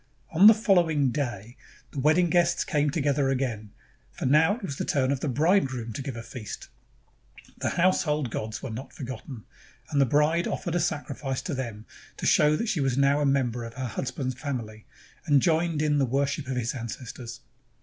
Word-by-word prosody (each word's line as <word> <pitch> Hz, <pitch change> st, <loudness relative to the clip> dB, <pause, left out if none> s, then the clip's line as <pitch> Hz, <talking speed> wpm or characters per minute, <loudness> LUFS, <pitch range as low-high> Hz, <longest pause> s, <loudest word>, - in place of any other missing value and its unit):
On 180 Hz, +6 st, +7 dB
the 220 Hz, -, +9 dB
following 170 Hz, -, +2 dB
day 120 Hz, -5 st, -4 dB, 0.3 s
the 140 Hz, -, -5 dB
wedding 155 Hz, +5 st, +3 dB
guests 175 Hz, 0 st, +3 dB
came 150 Hz, -1 st, +1 dB
together 140 Hz, -2 st, +1 dB
again, 125 Hz, -6 st, -2 dB, 0.4 s
for -, -, -6 dB
now 155 Hz, +9 st, +4 dB
it 235 Hz, -, -12 dB
was 140 Hz, -7 st, -4 dB
the -, -, -2 dB
turn 135 Hz, -2 st, +1 dB
of 140 Hz, -, 0 dB
the 145 Hz, -, -2 dB
bridegroom 130 Hz, -, +1 dB
to 140 Hz, -, -5 dB
give 135 Hz, -2 st, -5 dB
a 115 Hz, -, -6 dB
feast. 115 Hz, -2 st, -8 dB, 0.9 s
The -, -, 0 dB
household 155 Hz, -7 st, +2 dB
gods 110 Hz, 0 st, -4 dB
were 135 Hz, -, -4 dB
not 125 Hz, +5 st, -7 dB
forgotten, 125 Hz, -2 st, -7 dB, 0.5 s
and 145 Hz, -2 st, +3 dB
the 135 Hz, -, +4 dB
bride 150 Hz, +6 st, +2 dB
offered 170 Hz, -, -3 dB
a 175 Hz, -, +1 dB
sacrifice 145 Hz, -4 st, -3 dB
to 180 Hz, -, -3 dB
them 115 Hz, -5 st, -5 dB, 0.3 s
to -, -, -5 dB
show 150 Hz, 0 st, +4 dB
that 230 Hz, -, -2 dB
she 195 Hz, -8 st, 0 dB
was 135 Hz, -2 st, 0 dB
now 140 Hz, +1 st, +3 dB
a 145 Hz, -, +2 dB
member 125 Hz, -4 st, 0 dB
of 115 Hz, +1 st, -8 dB
her 130 Hz, 0 st, -4 dB
hus 125 Hz, +3 st, -3 dB
band's 130 Hz, -2 st, -3 dB
family 120 Hz, -6 st, -6 dB, 0.4 s
and 145 Hz, -2 st, +5 dB
joined 160 Hz, +1 st, +1 dB
in 150 Hz, -1 st, +2 dB
the 135 Hz, -, +3 dB
worship 140 Hz, +2 st, -1 dB
of 130 Hz, -1 st, -2 dB
his 120 Hz, +1 st, -1 dB
ancestors. 120 Hz, 0 st, -7 dB
140 Hz, 195 wpm, -27 LUFS, 125-155 Hz, 0.9 s, the